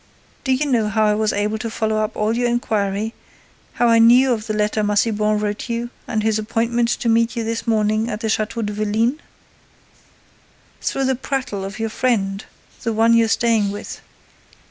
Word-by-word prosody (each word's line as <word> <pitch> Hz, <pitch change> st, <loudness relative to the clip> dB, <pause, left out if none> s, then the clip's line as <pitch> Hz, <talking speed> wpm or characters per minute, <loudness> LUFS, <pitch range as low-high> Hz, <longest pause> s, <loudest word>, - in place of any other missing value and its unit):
Do 265 Hz, -, -1 dB
you 260 Hz, +3 st, +2 dB
know 235 Hz, -6 st, +1 dB
how 215 Hz, 0 st, +2 dB
I 210 Hz, -, +3 dB
was 215 Hz, 0 st, +1 dB
able 210 Hz, +2 st, -1 dB
to 230 Hz, -, -4 dB
follow 220 Hz, -1 st, -1 dB
up 215 Hz, +1 st, -1 dB
all 215 Hz, +2 st, +1 dB
your 245 Hz, 0 st, +1 dB
inquiry, 215 Hz, -2 st, -1 dB, 0.6 s
how 240 Hz, -, +2 dB
I 230 Hz, 0 st, +5 dB
knew 245 Hz, +3 st, +6 dB
of 220 Hz, -1 st, -4 dB
the 215 Hz, -, -1 dB
letter 210 Hz, +1 st, 0 dB
Massiban 210 Hz, 0 st, +1 dB
wrote 210 Hz, +3 st, -3 dB
you 235 Hz, +1 st, -3 dB, 0.2 s
and 220 Hz, -2 st, -1 dB
his 220 Hz, 0 st, +1 dB
appointment 230 Hz, +2 st, 0 dB
to 240 Hz, -, -1 dB
meet 230 Hz, +1 st, +2 dB
you 230 Hz, -, -2 dB
this 230 Hz, +1 st, -3 dB
morning 215 Hz, 0 st, +1 dB
at 210 Hz, +1 st, -4 dB
the 225 Hz, -, -1 dB
Château 220 Hz, +1 st, -1 dB
de 210 Hz, -, -3 dB
Vélines? 220 Hz, +6 st, 0 dB, 1.6 s
Through 270 Hz, -, -1 dB
the 265 Hz, -, +2 dB
prattle 260 Hz, -6 st, -3 dB
of 195 Hz, +3 st, -6 dB
your 225 Hz, -1 st, -2 dB
friend, 205 Hz, -4 st, -1 dB, 0.4 s
the 230 Hz, -, -1 dB
one 225 Hz, +1 st, +4 dB
you're 230 Hz, -1 st, +4 dB
staying 225 Hz, -2 st, +2 dB
with. 205 Hz, +1 st, -7 dB
220 Hz, 190 wpm, -20 LUFS, 210-235 Hz, 1.6 s, knew